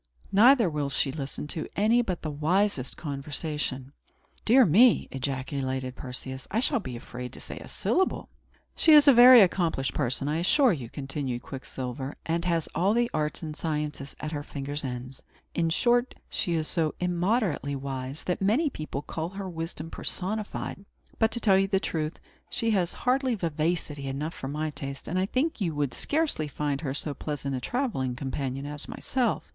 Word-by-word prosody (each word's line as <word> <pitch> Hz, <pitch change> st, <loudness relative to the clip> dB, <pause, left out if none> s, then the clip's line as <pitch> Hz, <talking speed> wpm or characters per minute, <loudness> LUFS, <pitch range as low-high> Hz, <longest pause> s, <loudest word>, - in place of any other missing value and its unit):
Neither 235 Hz, +2 st, +6 dB
will 150 Hz, -3 st, -1 dB
she 135 Hz, 0 st, 0 dB
listen 140 Hz, 0 st, -5 dB
to 155 Hz, -, -1 dB
any 220 Hz, +4 st, +4 dB
but 185 Hz, -7 st, -3 dB
the 155 Hz, -, -2 dB
wisest 155 Hz, -1 st, 0 dB
conversation." 145 Hz, -2 st, -3 dB, 0.5 s
"Dear 250 Hz, +3 st, +7 dB
me!" 215 Hz, +8 st, +5 dB
ejaculated 130 Hz, -1 st, -3 dB
Perseus; 130 Hz, +1 st, -6 dB
"I 215 Hz, -, 0 dB
shall 260 Hz, +1 st, +4 dB
be 130 Hz, -, -6 dB
afraid 125 Hz, +1 st, -7 dB
to -, -, -8 dB
say -, -, -7 dB
a -, -, -10 dB
syllable." 375 Hz, +1 st, 0 dB, 0.5 s
"She 320 Hz, -, +6 dB
is 300 Hz, -1 st, +8 dB
a 280 Hz, -, +9 dB
very 245 Hz, 0 st, +10 dB
accomplished 170 Hz, -8 st, +1 dB
person, 135 Hz, 0 st, 0 dB
I 150 Hz, +2 st, 0 dB
assure 240 Hz, -, +4 dB
you," 125 Hz, -8 st, -6 dB
continued 135 Hz, -3 st, -4 dB
Quicksilver, 130 Hz, 0 st, -6 dB
"and 170 Hz, +1 st, -1 dB
has 170 Hz, -3 st, +1 dB
all 195 Hz, +6 st, +2 dB
the 240 Hz, 0 st, +2 dB
arts 155 Hz, +2 st, -1 dB
and 155 Hz, -1 st, -5 dB
sciences 150 Hz, -3 st, -3 dB
at 155 Hz, -, -4 dB
her 145 Hz, -2 st, -3 dB
fingers' 145 Hz, 0 st, -4 dB
ends. 130 Hz, 0 st, -6 dB, 0.3 s
In 165 Hz, -1 st, +1 dB
short, 240 Hz, +8 st, +2 dB
she 175 Hz, -, 0 dB
is 155 Hz, -1 st, -1 dB
so 160 Hz, -3 st, 0 dB
immoderately 180 Hz, -, 0 dB
wise, 135 Hz, +1 st, -5 dB
that 180 Hz, -, -2 dB
many 250 Hz, +10 st, +2 dB
people 155 Hz, -, -5 dB
call 160 Hz, +2 st, -4 dB
her 195 Hz, 0 st, -6 dB
wisdom 165 Hz, -2 st, -5 dB
personified. 200 Hz, 0 st, -2 dB, 0.4 s
But, 225 Hz, -, +4 dB
to 235 Hz, -, -2 dB
tell 195 Hz, -4 st, +4 dB
you 195 Hz, -, +2 dB
the 195 Hz, -1 st, +2 dB
truth, 155 Hz, -4 st, -3 dB, 0.3 s
she 230 Hz, -2 st, 0 dB
has 180 Hz, -5 st, +1 dB
hardly 255 Hz, -1 st, +1 dB
vivacity 160 Hz, -4 st, -2 dB
enough 145 Hz, +5 st, -3 dB
for 135 Hz, -, -6 dB
my 155 Hz, +2 st, -2 dB
taste; 140 Hz, -1 st, -7 dB
and 180 Hz, -, 0 dB
I 190 Hz, -, +1 dB
think 260 Hz, +3 st, -1 dB
you 165 Hz, -5 st, 0 dB
would 145 Hz, -4 st, -1 dB
scarcely 290 Hz, -, 0 dB
find 145 Hz, 0 st, -2 dB
her 135 Hz, -3 st, -3 dB
so 145 Hz, 0 st, -2 dB
pleasant 140 Hz, -2 st, -4 dB
a 130 Hz, -, -1 dB
travelling 135 Hz, -, -1 dB
companion 135 Hz, 0 st, -3 dB
as 145 Hz, 0 st, -4 dB
myself. 250 Hz, -4 st, -1 dB
155 Hz, 175 wpm, -27 LUFS, 140-200 Hz, 0.5 s, very